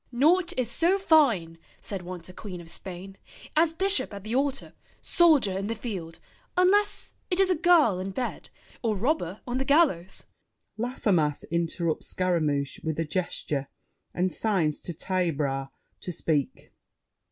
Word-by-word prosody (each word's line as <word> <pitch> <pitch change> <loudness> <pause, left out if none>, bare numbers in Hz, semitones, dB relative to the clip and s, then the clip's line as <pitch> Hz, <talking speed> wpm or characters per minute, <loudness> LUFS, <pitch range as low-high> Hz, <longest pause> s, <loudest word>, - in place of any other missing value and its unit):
"'Naught 335 +8 +3
is 245 -2 0
so 350 +8 +3
fine,' 240 - +3 0.2
said 195 -3 -5
once 175 -1 -8
a 180 - -11
Queen 185 -2 -7
of 165 -1 -8
Spain, 190 +1 -6 0.4
'As 320 +1 +4
bishop 385 - +1
at 200 - -8
the 215 +2 -4
altar, 275 +1 0 0.3
soldier 300 - +4
in 195 +1 -2
The 230 - -2
field, 190 -8 -6 0.4
unless 405 +2 +3 0.2
it 360 -1 +1
is 385 -1 +4
a - - +3
girl 310 - +4
in 190 +1 -3
bed, 245 +6 -4 0.3
Or 225 -3 0
robber 210 - -1
on 245 +1 -2
the - - +1
gallows—'" 270 - +2 0.5
[Laffemas 200 - 0
interrupts 170 -1 -1
Scaramouche 155 -6 0
with 160 -1 -2
a 165 - 0
gesture 150 -4 -2 0.4
and 180 +1 0
signs 180 -9 0
to 175 - -6
Taillebras 150 -7 -1 0.3
to 180 - -5
speak. 155 -4 -2
195 Hz, 150 wpm, -27 LUFS, -, 0.5 s, As